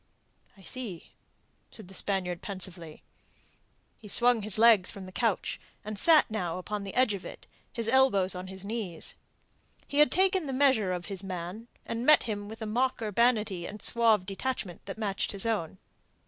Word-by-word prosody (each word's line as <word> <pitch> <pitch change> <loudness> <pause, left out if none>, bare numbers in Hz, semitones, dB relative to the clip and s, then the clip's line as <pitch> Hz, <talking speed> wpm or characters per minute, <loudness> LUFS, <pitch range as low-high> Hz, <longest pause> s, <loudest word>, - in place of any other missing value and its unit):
"I 195 - -17
see," 195 -2 -6 0.6
said 215 -5 -11
the 190 - -13
Spaniard 185 -3 -2
pensively. 180 -5 -6 0.9
He 215 - -13
swung 240 +2 +3
his 210 0 +3
legs 220 -4 +6
from 195 -2 -7
the 185 - -10
couch, 210 +2 -1 0.2
and 215 -1 -5
sat 315 -5 +5
now 180 -6 -2
upon 205 +3 -4
the 195 - -7
edge 255 -4 +3
of 195 - -6
it, - - -10 0.3
his 230 -2 -3
elbows 230 -7 +4
on 180 0 -6
his 190 +1 -8
knees. 205 -6 -5 0.7
He 285 - -1
had 300 - +6
taken 375 -3 +2
the 270 - -3
measure 260 -8 +3
of 175 -1 -3
his 195 -1 -5
man, 185 +4 -6 0.2
and 230 +1 -4
met 305 +3 +6
him 205 -2 -4
with 220 +1 -8
a - - -3
mock 250 +5 0
urbanity 215 -4 +1
and 210 - -8
a - - -6
suave 225 -5 +4
detachment 195 -2 -4
that 195 - -6
matched 205 -3 -1
his 200 +1 +1
own. 200 -6 -2
210 Hz, 180 wpm, -29 LUFS, 185-235 Hz, 0.9 s, legs